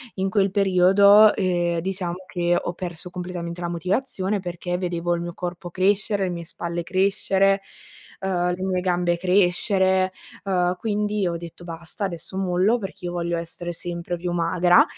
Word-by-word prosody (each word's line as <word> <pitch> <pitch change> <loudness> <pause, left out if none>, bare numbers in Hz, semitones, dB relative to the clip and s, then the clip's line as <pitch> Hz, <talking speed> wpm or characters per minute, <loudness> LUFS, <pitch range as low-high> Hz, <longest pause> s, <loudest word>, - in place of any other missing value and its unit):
in 190 0 -1
quel 195 -1 +2
periodo, 200 +2 +6
ehm, 175 -3 0
diciamo 180 0 -3
che 175 -1 +1
ho 175 - -3
perso 175 -1 -6
completamente 175 -1 -5
la 175 - -2
motivazione 195 +3 -1
perché 175 0 -3
vedevo 175 -1 -1
il 170 - -3
mio 175 0 -5
corpo 175 0 -5
crescere, 200 +3 +1
le 185 - 0
mie 170 -1 -4
spalle 170 +1 -4
crescere, 195 +1 +2 0.6
ehm, 180 -2 0
le 185 - -6
mie 185 -1 0
gambe 175 -1 +1
crescere, 185 +1 +2 0.3
uhm, 180 -2 +2
quindi 210 -1 -1
ho 170 - -1
detto: 170 +1 -10
"Basta, 170 +4 -5
adesso 170 0 -6
mollo 190 +4 +2
perché 195 -3 -7
io 175 - -2
voglio 170 -1 -2
essere 170 +1 -5
sempre 170 +1 -4
più 175 +1 -3
magra." 175 +1 +4
180 Hz, 160 wpm, -23 LUFS, 175-190 Hz, 0.6 s, periodo